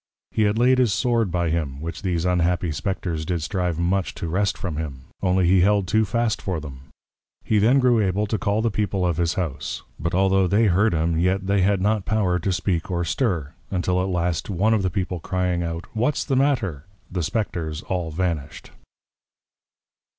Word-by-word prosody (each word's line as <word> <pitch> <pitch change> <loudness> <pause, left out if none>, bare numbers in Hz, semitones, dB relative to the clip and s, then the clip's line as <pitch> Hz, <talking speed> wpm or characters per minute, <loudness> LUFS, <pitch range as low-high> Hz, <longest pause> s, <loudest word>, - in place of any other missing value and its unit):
He 110 - +2
had 105 +1 +1
laid 125 +2 +4
his 125 -4 +3
Sword 115 0 +1
by 85 -2 0
him, 75 -5 -2
which 80 +2 -6
these 90 -3 -1
unhappy 90 -1 +1
Spectres 85 -1 -3
did 85 -1 -2
strive 90 -1 -1
much 90 +2 0
to 85 - -4
wrest 95 +4 0
from 85 -6 -4
him; 70 -5 -5 0.2
only 95 0 +2
he 90 +1 +5
held 100 0 +3
too 110 +3 +2
fast 115 0 0
for 90 -4 -2
them. 70 -2 -10 0.5
He 110 - +2
then 115 +6 +4
grew 125 -3 +4
able 100 +1 +1
to 110 +1 -2
call 110 -1 0
the 115 - +1
People 100 -3 -1
of 85 -3 0
his 85 0 0
House; 80 -7 -3 0.2
but 85 +2 -1
altho' 95 0 +3
they 105 +5 +3
heard 100 +1 +3
him, 80 +1 +1
yet 95 +2 +1
they 100 0 +2
had 95 0 +2
not 105 0 +1
power 95 -5 +1
to 95 +3 -1
speak 90 -1 -1
or 85 -1 -1
stir; 85 - -1 0.2
until 90 -1 0
at 95 - -1
last, 90 -1 -1
one 100 +4 +2
of 110 - +2
the 95 - 0
People 90 -2 -3
crying 90 0 -1
out, 85 0 -4
What's 125 +7 0
the 135 - 0
matter? 115 - +1 0.3
The 90 -1 -2
Spectres 80 -3 -2
all 90 -3 -2
vanished. 80 -3 -3
90 Hz, 195 wpm, -23 LUFS, 85-105 Hz, 0.5 s, he